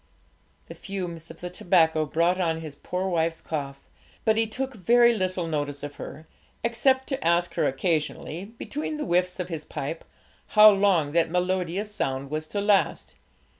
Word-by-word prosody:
The -, -, -9 dB
fumes 175 Hz, -4 st, -6 dB
of 165 Hz, -, -12 dB
the 180 Hz, 0 st, -5 dB
tobacco 160 Hz, -4 st, +2 dB
brought 170 Hz, +5 st, +1 dB
on 165 Hz, -2 st, 0 dB
his 155 Hz, -3 st, -7 dB
poor 180 Hz, +6 st, -3 dB
wife's 165 Hz, -2 st, 0 dB
cough, 140 Hz, -3 st, -5 dB, 0.4 s
but 220 Hz, -, +4 dB
he 225 Hz, 0 st, +2 dB
took 265 Hz, +4 st, -4 dB
very 235 Hz, +3 st, +4 dB
little 185 Hz, -3 st, -1 dB
notice 145 Hz, -3 st, -3 dB
of 145 Hz, 0 st, -7 dB
her, 155 Hz, -, -8 dB, 0.4 s
except 260 Hz, +3 st, +2 dB
to 270 Hz, -, -3 dB
ask 170 Hz, +1 st, +2 dB
her -, -, +1 dB
occasionally, 160 Hz, +3 st, -2 dB
between 285 Hz, +8 st, -5 dB
the 300 Hz, -, -3 dB
whiffs 180 Hz, -1 st, +1 dB
of 180 Hz, 0 st, -3 dB
his 160 Hz, -3 st, -4 dB
pipe, 155 Hz, +2 st, -5 dB, 0.5 s
how 215 Hz, 0 st, +10 dB
long 195 Hz, -7 st, +2 dB
that 165 Hz, +1 st, +2 dB
melodious 180 Hz, +3 st, -1 dB
sound 135 Hz, -6 st, -2 dB
was 155 Hz, +1 st, -3 dB
to 205 Hz, -, -2 dB
last. 205 Hz, -1 st, +1 dB
175 Hz, 170 wpm, -26 LUFS, 160-205 Hz, 0.5 s, how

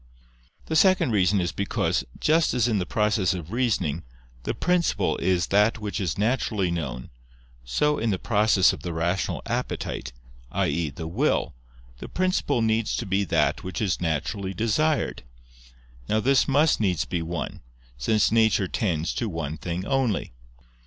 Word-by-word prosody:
The 160 Hz, -, -3 dB
second 180 Hz, -4 st, +4 dB
reason 100 Hz, -1 st, +3 dB
is 85 Hz, -3 st, -1 dB
because, 100 Hz, -6 st, -1 dB, 0.2 s
just 160 Hz, -2 st, +2 dB
as 120 Hz, -1 st, +2 dB
in 110 Hz, -4 st, +1 dB
the 90 Hz, -, -3 dB
process 105 Hz, -4 st, +1 dB
of 85 Hz, -1 st, -7 dB
reasoning, 95 Hz, -, 0 dB, 0.4 s
the -, -, -2 dB
principle 180 Hz, -1 st, +1 dB
is 90 Hz, -2 st, +1 dB
that 105 Hz, +3 st, +3 dB
which 105 Hz, -1 st, -4 dB
is 90 Hz, -1 st, -2 dB
naturally 105 Hz, -4 st, 0 dB
known, 65 Hz, -8 st, -4 dB, 0.5 s
so 150 Hz, -, +1 dB
in 115 Hz, -, 0 dB
the 95 Hz, -, +1 dB
process 105 Hz, -2 st, +3 dB
of -, -, -8 dB
the 85 Hz, -, -4 dB
rational 85 Hz, +3 st, -1 dB
appetite, 65 Hz, -, -3 dB, 0.4 s
i.e. 85 Hz, -3 st, 0 dB
the 75 Hz, +4 st, -7 dB
will, 80 Hz, -, 0 dB, 0.5 s
the -, -, -8 dB
principle 185 Hz, -10 st, 0 dB
needs 110 Hz, 0 st, +1 dB
to 120 Hz, -, -3 dB
be 100 Hz, +1 st, +1 dB
that -, -, +1 dB
which 95 Hz, -, -5 dB
is 100 Hz, -5 st, -1 dB
naturally 90 Hz, +5 st, -2 dB
desired. 140 Hz, -, 0 dB, 0.9 s
Now 110 Hz, -, +2 dB
this 135 Hz, +4 st, +3 dB
must 145 Hz, +2 st, +3 dB
needs 90 Hz, -8 st, +1 dB
be 85 Hz, -2 st, -2 dB
one: 80 Hz, -2 st, -5 dB, 0.3 s
since 105 Hz, -, +1 dB
nature 110 Hz, -3 st, +3 dB
tends 85 Hz, -5 st, -1 dB
to 115 Hz, -, -2 dB
one 80 Hz, -4 st, -4 dB
thing 90 Hz, +3 st, -4 dB
only. 130 Hz, -, 0 dB
100 Hz, 155 wpm, -25 LUFS, 85-115 Hz, 0.9 s, second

